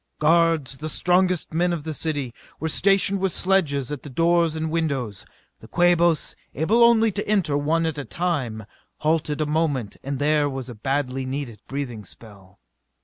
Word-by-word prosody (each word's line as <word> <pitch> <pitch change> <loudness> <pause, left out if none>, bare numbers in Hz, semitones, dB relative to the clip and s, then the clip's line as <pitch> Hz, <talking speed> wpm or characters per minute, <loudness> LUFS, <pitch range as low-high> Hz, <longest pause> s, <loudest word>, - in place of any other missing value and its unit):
Guards, 160 -3 +2
the 155 +1 -4
strongest 180 0 +1
men 175 +2 +1
of 165 -4 -3
the 160 0 -4
city, 145 -6 -2 0.3
were 160 - -2
stationed 195 +3 +3
with 190 -1 0
sledges 150 -9 +1
at 145 - -5
the 145 - -10
doors 165 +2 +2
and 160 0 -3
windows. 135 - -2 0.3
The - - -14
Quabos, 175 -2 +2 0.2
able 210 - +3
only 225 -2 +5
to 205 +1 -4
enter 195 -9 +1
one 160 +3 +1
at 160 -2 -2
a - - -3
time, 135 - -2 0.4
halted 155 -1 0
a - - +1
moment 150 -8 -1
and 140 0 -3
there 145 +1 +2
was 135 -2 -5
a - - -6
badly 135 +3 -2
needed 130 -5 -5
breathing 130 -6 -5
spell. 100 -3 -13
155 Hz, 170 wpm, -23 LUFS, 135-170 Hz, 0.4 s, only